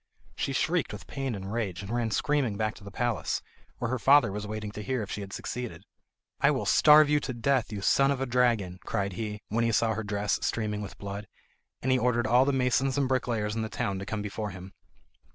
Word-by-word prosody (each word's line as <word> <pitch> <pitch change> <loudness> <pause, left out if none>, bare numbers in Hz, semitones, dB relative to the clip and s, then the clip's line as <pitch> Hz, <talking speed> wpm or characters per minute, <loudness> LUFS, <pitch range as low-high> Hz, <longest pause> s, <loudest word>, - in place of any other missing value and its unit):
She - - -2
shrieked 160 +6 0
with - - -8
pain 135 -4 -3
and 95 +1 -6
rage, 100 -6 -2
and 100 - -7
ran 120 -1 0
screaming 130 -3 0
back 110 0 0
to 105 - -15
the 100 - -8
palace, 120 +2 -1 0.3
where 115 0 -2
her 130 - -1
father 140 -4 +5
was 105 +1 -4
waiting 105 0 -4
to 105 - -7
hear 125 +1 -1
if 100 - -8
she 105 - -4
had 100 -1 -7
succeeded. 110 -6 -5 0.6
"I - - +5
will - - 0
starve 150 0 +7
you 150 0 +3
to 130 - -4
death, 125 0 +1
you 105 -2 -4
son 135 +7 +4
of 140 -2 0
a 135 - 0
dragon," 115 -8 +1
cried 100 -1 -2
he, 105 +2 -5
when 115 +3 +1
he 115 - +2
saw 110 +1 +2
her 110 +1 -3
dress 105 -1 -1
streaming 105 -2 -1
with 100 - -7
blood; 100 +1 -6 0.6
and 130 - +1
he 130 - +4
ordered 120 -2 +1
all 125 +4 +5
the 140 - +2
masons 130 +1 +1
and 140 -2 +2
bricklayers 115 -5 0
in 115 - -1
the 110 - -3
town 100 -4 -2
to 95 - -5
come 105 -1 -3
before 105 +1 -4
him. 95 0 -10
110 Hz, 235 wpm, -28 LUFS, 105-130 Hz, 0.6 s, starve